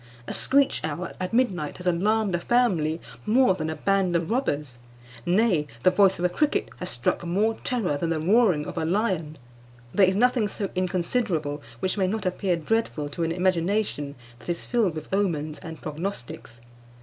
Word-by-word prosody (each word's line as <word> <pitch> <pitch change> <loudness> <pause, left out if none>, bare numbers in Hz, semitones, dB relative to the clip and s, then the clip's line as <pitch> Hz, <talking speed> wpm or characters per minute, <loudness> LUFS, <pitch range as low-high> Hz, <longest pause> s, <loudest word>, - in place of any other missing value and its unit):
A - - -3
screech 275 +1 +2
owl 160 +3 -3
at 185 0 -3
midnight 195 - 0
has 180 - -10
alarmed 200 +3 +2
a 175 - +1
family 170 -9 +2 0.3
more 245 -1 +5
than 160 -3 -3
a 160 - -3
band 190 +2 +1
of 170 +3 0
robbers; 150 - -1 0.5
nay, 180 -5 +3 0.2
the 185 - +6
voice 190 0 +4
of 175 - -1
a - - +6
cricket 290 +12 0
has 180 - -4
struck 120 +7 -1
more 200 +6 +1
terror 215 - 0
than 165 +3 -2
the 165 -1 0
roaring 185 -3 +3
of 170 - -4
a - - -1
lion. 175 -4 0 0.6
There 195 -2 +5
is 190 - +1
nothing 245 0 +3
so 200 -1 -4
inconsiderable 180 -4 -1 0.2
which 185 +2 0
may 190 - +2
not 210 +1 -2
appear 185 0 0
dreadful 165 -4 -1
to 155 - -6
an 165 0 +1
imagination 180 -4 0 0.2
that 120 - -11
is 170 - -2
filled 220 -9 +1
with 155 - -6
omens 155 -6 0
and 160 -1 -8
prognostics. 150 - -6
180 Hz, 180 wpm, -25 LUFS, 160-210 Hz, 0.6 s, the